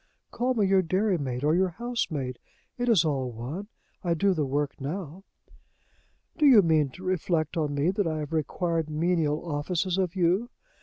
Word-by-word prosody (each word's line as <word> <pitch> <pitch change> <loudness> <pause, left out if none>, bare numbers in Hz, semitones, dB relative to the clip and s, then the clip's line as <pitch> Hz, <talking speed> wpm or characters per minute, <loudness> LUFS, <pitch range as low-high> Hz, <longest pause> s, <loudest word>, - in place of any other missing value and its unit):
Call 255 +1 0
me 210 -3 +2
your 190 0 +4
dairymaid 170 - -1
or 150 +1 +3
your 185 +2 +3
housemaid. 165 - -3 0.4
It 245 0 -1
is 190 -8 +5
all 135 -4 -1
one 130 - -6 0.4
I 170 -2 +1
do 195 +3 +2
the 150 -5 -1
work 145 +1 0
now." 170 +4 -5 1.2
"Do 300 - +6
you 230 -7 +8
mean 155 -4 +3
to 185 - -11
reflect 175 -3 -1
on 150 -3 -1
me 145 +5 +2
that 195 -2 0
I 155 -1 -1
have 150 +1 -5
required 165 +1 -1
menial 155 -1 0
offices 170 +4 -1
of 185 -1 -1
you? 185 +6 +1
170 Hz, 170 wpm, -27 LUFS, 150-190 Hz, 1.2 s, you